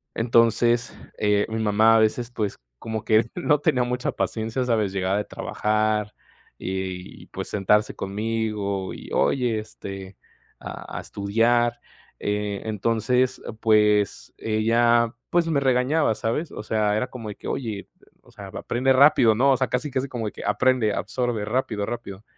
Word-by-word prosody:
Entonces, 115 +1 +2 0.2
eh, 105 0 +2
mi 110 0 -2
mamá 110 +2 +4
a - - +4
veces, 115 +2 +1
pues, 105 -4 -3 0.2
como 110 -1 -4
que 110 +1 +4
no 150 -5 +2
tenía 125 -3 +2
mucha 125 +1 -2
paciencia, 115 +3 -2
¿sabes?, 110 -5 +1
llegaba 95 +1 0
de 105 - -2
trabajar 105 0 -1 0.4
y 95 -1 -5
pues - - -6
sentarse 105 +1 +2
conmigo 105 -2 -2
y: - - -10
"Oye, 120 -5 +1
este, 95 -2 -9 0.4
a - - -8
a - - -5
estudiar". 115 +4 +1 0.4
Eh, 105 -1 -2
entonces, 115 +4 0 0.2
pues 105 -2 +2
ella, 115 +2 +2 0.2
pues, 170 -1 +2
me 145 -3 +2
regañaba, 130 0 +2
¿sabes?, 120 +10 -2
o - - -7
sea, 105 -1 +1
era 125 - -1
como 115 -4 -8
de 105 - -6
que: - - -10
"Oye, 110 -6 -3
eh, - - -22 0.4
o - - -20
sea, - - -10
aprende 130 +2 0
rápido, 130 -5 +6
¿no?", 135 +4 +4
o 130 - +3
sea, 130 - 0
casi, 130 +4 -1
casi 130 +2 -1
como 115 -3 -3
de - - -4
que: - - -9
"Aprende, 115 0 +2
absorbe, 120 -4 -2
rápido, 110 -3 -1
rápido", 110 -4 -6
110 Hz, 160 wpm, -24 LUFS, 105-125 Hz, 0.4 s, rápido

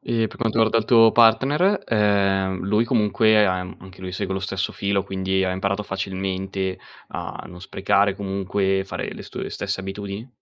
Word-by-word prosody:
E 115 -1 0
per - - -13
quanto 115 -1 -1
riguarda 115 0 +4
il 110 - -1
tuo 115 -1 +6
partner, 135 - +4
ehm, 100 -3 +1
lui 105 +4 +2
comunque 110 -2 +3
am 90 0 -2
anche 95 0 -14
lui 95 -1 -6
segue 95 +1 -3
lo 95 - -2
stesso 95 -1 -3
filo, 100 0 0
quindi 95 -1 -1
ha 95 - 0
imparato 100 +2 -1
facilmente 95 -1 -3 0.3
a - - -6
non 90 0 -11
sprecare 100 +1 +1
comunque, 95 0 -1
fare 95 - -5
le - - -9
stu - - -8
le - - -5
stesse - - -3
abitudini? 100 +4 -6
100 Hz, 180 wpm, -23 LUFS, 95-110 Hz, 0.3 s, tuo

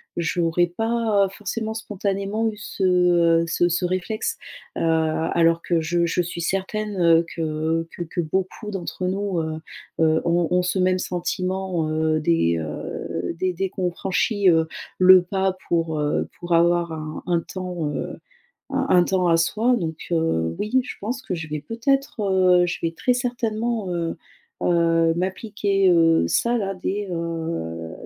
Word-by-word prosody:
j'aurais 170 0 +1
pas 225 +1 +1
forcément 220 +2 -4
spontanément 205 0 -2
eu 220 - -2
ce, 205 -2 -5
heu, 175 -2 +4
ce 170 +1 +2
ce 175 +2 0
réflexe, 185 +5 -2 0.4
heu, - - -2
alors 165 +1 +2
que 170 -2 +1
je 170 +2 +1
je 175 - +1
suis 170 0 -5
certaine, 195 +3 -2
heu, 165 0 +5
que 160 0 -1
que - - -9
que 170 +1 -6
beaucoup 190 +6 -3
d'entre 185 -1 -4
nous, 195 -1 -1
heu 160 0 -3 0.5
heu, 160 0 +3
ont 170 0 +2
ont 180 0 +3
ce 180 +1 -1
même 185 0 +2
sentiment, 180 -1 -2
heu, 155 0 +1
dès, 85 - +2
heu, 85 +2 -4
dès 185 -1 0
dès 190 +2 -2
qu'on 180 -1 -2
franchit, 195 +2 +1
heu, 160 -1 +3 0.3
le 185 0 +8
pas 190 +1 -1
pour, 165 -2 0
heu, 150 0 0
pour 175 0 -2
avoir 170 0 +3
un 155 -1 -6
un 175 -2 +2
temps, 180 -3 -5
heu - - -5 0.5
un 270 0 0
un 180 -1 +5
temps 180 -1 +1
à 165 - +5
soi. 220 +9 +2
Donc 160 -6 -4
heu, 160 - 0
oui 235 +5 +1
je - - -6
pense 240 +6 -3
que 185 - -3
je 160 -2 -5
vais 150 0 -3
peut-être, 235 - -1
heu 185 -2 +4
je 175 - -3
vais 165 - 0
très 250 +9 +1
certainement, 235 -4 -2
heu 170 -1 -2 0.5
heu, 165 -1 +3
m'appliquer, 195 +1 0
heu, 165 - +4
ça 235 - +2
là, 195 -3 -2
dès, 200 +2 -3
heu, 165 - -4
175 Hz, 165 wpm, -23 LUFS, 165-195 Hz, 0.5 s, le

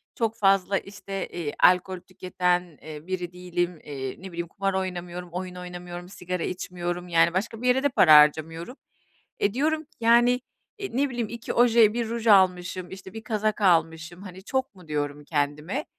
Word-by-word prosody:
çok 225 -1 -1
fazla, 195 -1 +3
işte, 195 -1 -6
eee, 165 -4 -5
alkol 180 0 +4
tüketen, 180 -3 -2
eee, 155 +1 -9
biri 180 -2 -4
değilim. 175 -2 -3
Eee, 135 -3 -5
ne 190 -1 -8
bileyim, 170 0 -4
kumar 195 +3 -2
oynamıyorum, 180 -2 -4
oyun 180 0 -5
oynamıyorum, 180 0 -8
sigara 180 -2 -4
içmiyorum, 175 -1 -4
yani, 170 0 +4
başka 220 +5 -2
bir 250 - -1
yere 260 +2 +3
de 285 - +3
para 165 - +6
harcamıyorum. 160 - +3 0.6
E, 200 - +1
diyorum 310 +5 0
ki, 290 - -32
yani, 240 +2 +4 0.4
eee, 395 - -4
ne 280 0 +2
bileyim, 240 -3 -3
"2 235 -1 -5
oje, 235 -3 +5
1 235 -2 -2
ruj 230 0 -3
almışım, 185 -2 +3
işte, 190 0 -10
1 225 0 -8
kazak 215 -1 -1
almışım, 165 -1 +1
hani, 190 0 -10
çok 260 -1 -2
mu?" 180 -4 -16
diyorum, 145 -1 -3
kendime. 150 - -2
180 Hz, 175 wpm, -26 LUFS, 175-215 Hz, 0.6 s, para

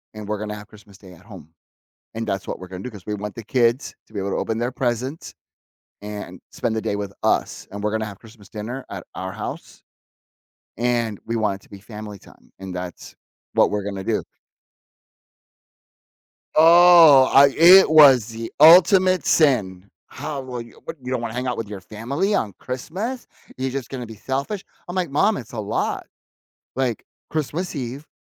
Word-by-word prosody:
and 105 -1 -8
we're 105 0 -3
gonna 105 0 -5
have 105 0 -11
Christmas 100 -2 -17
Day 95 -3 -15
at 80 - -18
home. 80 +3 -13 0.6
And 115 0 -4
that's 100 -2 -3
what - - -4
we're 95 - -9
gonna 95 0 -8
do, 125 - -6
'cause 100 -3 -13
we 105 - -2
want 105 0 -6
the 115 - -8
kids 120 +2 +1
to - - -25
be - - -6
able 100 0 -2
to - - -1
open 110 0 -2
their 120 +2 -2
presents, 130 +4 -3 0.7
and 105 -4 -7
spend 120 -3 -2
the 110 - -1
day 100 - -2
with 100 -1 -4
us, - - 0
and 100 +1 -7
we're 105 - +1
gonna 110 0 -1
have 100 -2 -9
Christmas 110 -3 -17
dinner 120 +5 -6
at 95 -3 -7
our 95 0 -5
house. 110 - -8 1.0
And 120 -3 -1
we 115 - -3
want 105 -3 -1
it - - -25
to - - -22
be 100 - -11
family 105 0 -9
time, - - -20
and 95 -1 -7
that's 90 0 -8 0.4
what - - +4
we're 105 -1 -2
gonna 100 -1 -5
do." - - -1 2.3
Oh, 165 -4 +8
I 140 +1 +8
it 180 +4 +8
was 140 -7 +7
the 115 0 -7
ultimate 185 +3 +6
sin. 100 - +2 0.2
"How 145 0 -6
will 125 -2 -6
you 115 0 -14
what, - - -6
you 125 - -6
don't 130 - 0
wanna 115 -2 -4
hang 125 +1 -3
out 125 - -2
with 115 - -4
your 100 -2 -8
family 125 - -2
on 105 -3 -1
Christmas? 190 - -5 0.3
You're 130 0 -2
just 135 -2 -5
gonna 125 -3 -6
be 110 - -10
selfish?" 140 - -4 0.2
I'm, 175 - -6
like, 180 -5 -1
"Mom, 195 +9 +2
it's 120 - -10
a 115 - -4
lot, 105 0 -2 0.7
like, 125 -4 -1 0.2
Christmas 160 +4 -3
Eve, 130 +3 -6
115 Hz, 190 wpm, -22 LUFS, 105-140 Hz, 2.3 s, Oh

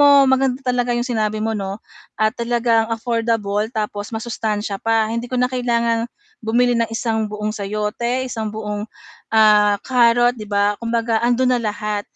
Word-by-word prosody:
mo 290 - +7 0.2
maganda 265 0 +1
talaga 245 -1 0
yung 240 - -1
sinabi 215 -3 -1
mo, 225 - 0
'no 195 -2 -3 0.4
at 215 0 +2
talagang 235 -1 +1
affordable 225 -2 -1
tapos 210 -3 -4
masustansiya 215 -3 -3
pa, 225 -1 +1
hindi 235 +1 -3
ko 255 - -3
na 250 0 +1
kailangang 235 -2 0 0.3
bumili 240 +2 +2
ng 230 -1 +1
isang 225 -1 -1
buong 210 0 -3
sayote, 215 +5 -2
isang 220 -3 -4
buong, 210 -1 -4 0.5
ah, 210 -2 +5
carrot, 240 -1 +4
'di 220 - -9
ba? 205 0 +2
Kumbaga 230 -1 0
andun 250 +1 +2
na 240 - 0
lahat, 210 -1 -2
225 Hz, 160 wpm, -20 LUFS, 215-240 Hz, 0.5 s, mo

